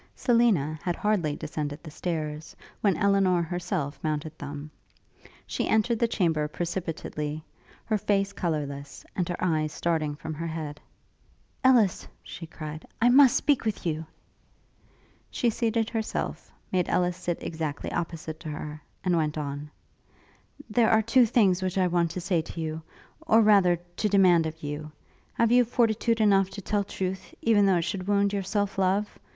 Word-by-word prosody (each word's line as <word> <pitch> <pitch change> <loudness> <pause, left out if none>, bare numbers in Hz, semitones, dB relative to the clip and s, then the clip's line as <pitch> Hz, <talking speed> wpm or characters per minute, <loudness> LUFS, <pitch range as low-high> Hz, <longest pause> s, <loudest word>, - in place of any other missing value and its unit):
Selina 210 - +2
had 175 -1 -1
hardly 180 -9 0
descended 150 -1 -5
the 160 - -9
stairs, 155 -2 -4 0.2
when 200 -4 +2
Elinor 195 -4 +3
herself 170 -3 -3
mounted 155 0 -2
them. 145 +1 -7 0.7
She - - -2
entered 220 +1 +2
the 235 - +3
chamber 165 -8 +1
precipitately, 160 -2 -4 0.4
her 215 -2 0
face 195 0 +1
colourless, 145 -4 -4
and 180 -2 -1
her 175 - -1
eyes 155 -4 0
starting 155 -3 -1
from 155 +1 -6
her 165 +2 -4
head. 155 -2 -5 0.8
'Ellis!' 240 -8 +4 0.2
she 165 - -8
cried, 155 -1 -7 0.2
'I 240 - +5
must 265 0 +7
speak 285 -2 +2
with 220 -4 -3
you!' 160 -1 -2 1.2
She 240 - +1
seated 225 0 0
herself, 225 -2 -3 0.2
made 180 -1 +1
Ellis 180 -1 +1
sit 175 -2 -4
exactly 160 -3 -4
opposite 165 -2 -4
to 160 - -7
her, 150 0 -6 0.2
and 180 -2 +2
went 155 -2 0
on: 145 0 -4 1.0
'There 225 +1 +3
are 220 0 +4
two 235 +2 +5
things 195 -5 +3
which 185 0 -2
I 185 - +4
want 175 -1 +1
to 180 +2 -5
say 175 -2 +1
to 165 - -9
you; 160 0 -3 0.5
or, 225 +1 +6
rather, 200 -4 +5 0.2
to 210 - +1
demand 180 -5 +5
of 160 0 -8
you. 150 +1 -5 0.4
Have 230 0 +2
you 245 0 +6
fortitude 230 -1 +1
enough 195 -3 +4
to 200 - -8
tell 205 +2 0
truth, 190 -1 -5
even 210 -3 +4
though 190 -2 +4
it 170 - 0
should 185 +1 -4
wound 200 0 +2
your 200 - 0
self 200 0 -1
love? 195 +2 0
180 Hz, 160 wpm, -27 LUFS, 155-205 Hz, 1.2 s, must